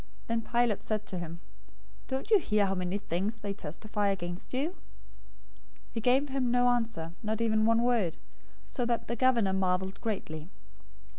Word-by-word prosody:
027:013 - - -23 0.2
Then 230 0 +1
Pilate 235 -2 +1
said 215 -1 -1
to 185 - -4
him, 170 0 -6 0.7
"Don't 265 +10 -3
you 425 - +8
hear 210 - +2
how 195 - +1
many 185 +1 -1
things 200 +2 -2
they 205 -2 -4
testify 205 +4 -2
against 175 -2 -3
you?" 270 +5 0
027:014 - - -19 1.2
He 225 - -3
gave 260 +5 +3
him 265 -2 0
no 245 0 +4
answer, 225 -9 0
not 220 0 -1
even 220 -1 +3
one 230 +1 +4
word, 230 -9 +2 0.5
so 245 - -2
that 235 -1 0
the 235 - -1
governor 235 -5 +3
marveled 190 0 0
greatly. 170 -8 -3
215 Hz, 170 wpm, -31 LUFS, 190-240 Hz, 1.2 s, you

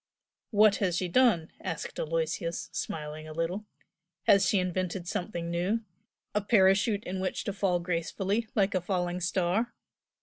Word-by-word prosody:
"What 210 -1 +5
has 180 -4 +1
she 180 - 0
done?" 175 -5 +3
asked 165 - -4
Aloysius, 165 +1 -2
smiling 155 0 -5
a 155 - -7
little 175 +6 -2 0.6
"Has 195 -2 +5
she 205 - +3
invented 185 -1 -1
something 175 -3 -3
new? 185 +7 0 0.5
a 210 - +1
parachute 205 0 +4
in 190 -2 -4
which 185 - -2
to 205 - -3
fall 190 -3 +1
gracefully 185 +5 -1
like 200 -1 +2
a 185 - +1
falling 180 -1 -1
star?" 185 +6 0
185 Hz, 145 wpm, -29 LUFS, 170-205 Hz, 0.6 s, What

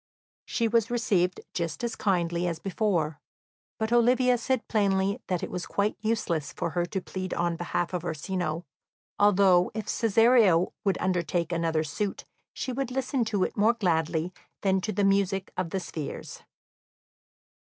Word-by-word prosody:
She 230 - 0
was 225 0 +2
received 195 -7 +1
just 165 +2 -3
as 235 - -2
kindly 175 -3 0
as 170 -2 -2
before, 175 -5 -1 0.6
but 220 +1 -1
Olivia 250 +1 +4
said 260 0 -1
plainly 200 -2 +1
that 180 -2 -1
it - - -4
was 180 - -4
quite 205 +1 0
useless 200 -9 -1
for 170 - -3
her 175 0 0
to 190 +2 -3
plead 185 +1 -4
on 170 -1 0
behalf 175 +1 -2
of 175 -2 -2
Orsino, 170 0 -3 0.5
although 190 -3 +5
if 220 - -3
Cesario 225 -5 +4
would 195 -3 +1
undertake 175 -2 0
another 165 -2 +1
suit 195 +7 -3 0.3
she 260 - -4
would 265 0 -2
listen 260 0 0
to 205 -4 0
it - - -2
more 215 +3 +4
gladly 165 -3 0 0.3
than 190 -1 +2
to 215 - -2
the 205 0 0
music 195 -1 +1
of 180 -2 -2
the 190 - -2
spheres. 160 -4 -6
190 Hz, 155 wpm, -27 LUFS, 175-220 Hz, 0.6 s, although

